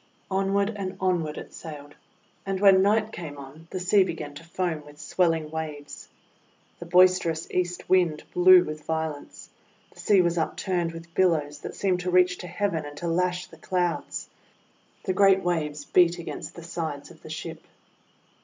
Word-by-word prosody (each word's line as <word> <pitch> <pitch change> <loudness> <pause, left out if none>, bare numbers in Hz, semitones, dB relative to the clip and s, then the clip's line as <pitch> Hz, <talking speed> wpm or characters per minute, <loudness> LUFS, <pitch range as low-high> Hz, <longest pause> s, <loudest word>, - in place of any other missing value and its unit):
Onward 195 +2 +1
and 190 -2 -5
onward 175 -5 0
it - - -9
sailed; 145 -2 -9 0.5
and 195 -1 -2
when 195 -1 +6
night 215 +2 +2
came 155 -7 -7
on 140 +4 -12
the 185 - -4
sea 190 +2 +4
began 155 -5 -5
to 145 - -11
foam 170 -2 -3
with 145 0 -15
swel 180 0 +1
ling 160 -2 -2
waves. 150 -2 -6 0.7
The 170 - -8
boisterous 180 -2 +4
East 180 -1 -2
Wind 175 -5 +2
blew 180 0 +7
with 155 -2 -6
violence. 160 -2 -4 0.4
The - - -19
sea 200 -3 +4
was 170 0 +1
upturned 175 +1 -1
with 165 0 -11
bil 185 +1 +4
lows 145 -3 -2
that - - -7
seemed 185 -2 0
to 180 +1 -3
reach 180 0 +3
to 180 - -7
heaven 175 -3 -1
and 145 0 -9
to 170 - -4
lash 180 +1 0
the 165 - -16
Clouds. 175 +1 -2 0.8
The 190 - -1
great 195 0 +5
waves 150 -4 -2
beat 175 -1 +4
against 170 - -7
the 170 - -9
sides 160 -4 -5
of - - -17
the - - -11
ship. - - -6
175 Hz, 175 wpm, -26 LUFS, 160-185 Hz, 0.8 s, blew